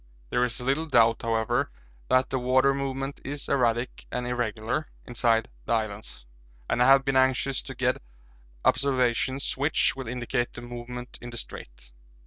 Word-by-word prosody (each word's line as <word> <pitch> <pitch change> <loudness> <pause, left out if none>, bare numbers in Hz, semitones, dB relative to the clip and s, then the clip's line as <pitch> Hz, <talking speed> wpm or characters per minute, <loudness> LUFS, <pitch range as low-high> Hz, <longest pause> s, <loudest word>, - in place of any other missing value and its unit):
There 125 - +2
is 120 0 -2
little 135 +6 0
doubt, 115 -5 +4
however, 115 +4 0 0.4
that 130 0 +3
the 130 - 0
water 130 +2 +3
movement 135 0 -3
is 145 +1 -5
erratic 120 -2 0
and 125 0 -2
irregular 120 +3 -2 0.2
inside 115 -1 +1 0.2
the - - 0
islands, 105 - -3 0.4
and 120 - 0
I 125 - +6
have 135 0 +6
been 135 -1 +1
anxious 130 0 +2
to - - -8
get - - 0 0.6
observations 130 0 +2
which 145 +3 +2
will 135 -3 -6
indicate 120 0 -2
the 120 - -8
movement 120 +1 -7
in 120 - -7
the 120 - -7
'Strait.' - - -7
125 Hz, 155 wpm, -27 LUFS, 120-135 Hz, 0.6 s, I